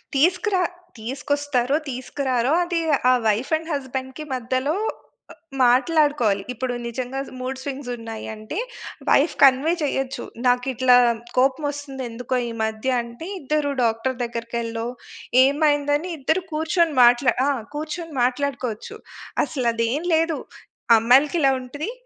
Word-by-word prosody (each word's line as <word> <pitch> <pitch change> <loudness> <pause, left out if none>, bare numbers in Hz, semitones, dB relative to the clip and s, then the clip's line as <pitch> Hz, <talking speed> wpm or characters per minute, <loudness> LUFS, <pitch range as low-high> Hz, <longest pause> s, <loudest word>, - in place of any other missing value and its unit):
తీసుకురా 365 +6 +2 0.4
తీసుకొస్తారో? 270 +2 -1
తీసుకురారో? 255 0 -1
అది 345 -1 -1 0.3
ఆ - - +6
వైఫ్ 220 +8 0
అండ్ 320 +1 -5
హస్బెండ్‌కి 265 +1 -4
మధ్యలో 255 +5 -1 0.6
అ - - -10 0.3
మాట్లాడుకోవాలి. 260 - +3
ఇప్పుడు 250 +1 -3
నిజంగా 250 +3 -4 0.2
మూడ్ 260 +1 -4
స్వింగ్స్ 275 -2 -5
ఉన్నాయి 225 -1 -7
అంటే, 215 - -7 0.5
వైఫ్ 290 +4 +4
కన్వే 275 +5 +5
చేయొచ్చు. 270 -2 -2 0.2
నాకిట్లా 250 0 +3 0.4
కోపం 270 +3 +2
ఒస్తుంది 275 -2 -7
ఎందుకో 250 +2 -3
ఈ - - -5
మధ్య? 220 +3 -2
అంటే 235 +8 -9
ఇద్దరు 295 0 0
డాక్టరు 230 +3 0
దగ్గరికెల్లో 230 -1 -4 0.6
ఏమైందని 290 +3 +1
ఇద్దరు 315 +6 0
కూర్చొని 320 0 +1
మాట్లా 240 +1 +5
ఆ! - - +3 0.3
కూర్చొని 315 +2 -5
మాట్లాడుకోవచ్చు. 255 - -2 0.5
అసలు 260 -4 -2
అది 230 0 0
ఏం 315 - -3
లేదు. 325 -1 +1 0.6
అమ్మాయిలకి 265 +9 +4
ఇలా 275 -2 +5
ఉంటది. 290 - -5
265 Hz, 120 wpm, -23 LUFS, 245-295 Hz, 0.6 s, ఆ